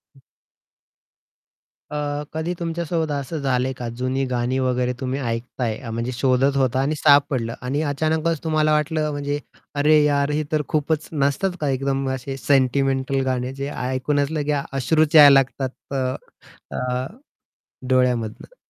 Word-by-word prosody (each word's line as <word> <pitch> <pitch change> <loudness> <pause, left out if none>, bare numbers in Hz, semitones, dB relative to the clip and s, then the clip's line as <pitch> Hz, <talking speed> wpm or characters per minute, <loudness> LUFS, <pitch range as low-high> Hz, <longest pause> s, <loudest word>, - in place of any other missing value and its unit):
हं. 135 - -21 1.7
अ, 145 0 -2
कधी 160 +3 -2
तुमच्यासोबत 165 -1 -2
असं 145 +3 -3
झालंय 130 -1 0
का 120 - -5
जुनी 130 +2 -1
गाणी 125 +1 0
वगैरे 125 -1 0
तुम्ही 130 +1 -2
ऐकताय 115 -2 -3
अ, 125 -4 -8
म्हणजे 115 +2 -2
शोधत 135 +2 +2
होता 130 -1 +1
आणि 150 +3 0
सापडलं 140 -6 +3
आणि 135 +4 -1
अचानकच 160 +2 0
तुम्हाला 155 -1 +2
वाटलं 150 0 0
म्हणजे, 145 0 -2 0.4
अरे 150 +2 +4
यार 140 -1 +2
हे 150 +1 0
तर 155 - +2
खूपच 155 0 -1
नसतात 145 +5 +1
का 145 - 0
एकदम 135 0 -1
असे 135 +1 -6
सेंटिमेंटल 135 0 +1
गाणे 130 0 -1
जे 140 +1 -4
ऐकूनच 140 +3 -1
लगे 150 -1 -1 0.2
अश्रुच 155 +4 +1
यायला 145 -2 +10
लागतात 135 +1 -6
अ, 130 -1 -1 0.6
अ, 125 +1 -2 0.8
डोळ्यामधनं. 125 - 0
140 Hz, 140 wpm, -22 LUFS, 130-150 Hz, 1.7 s, यायला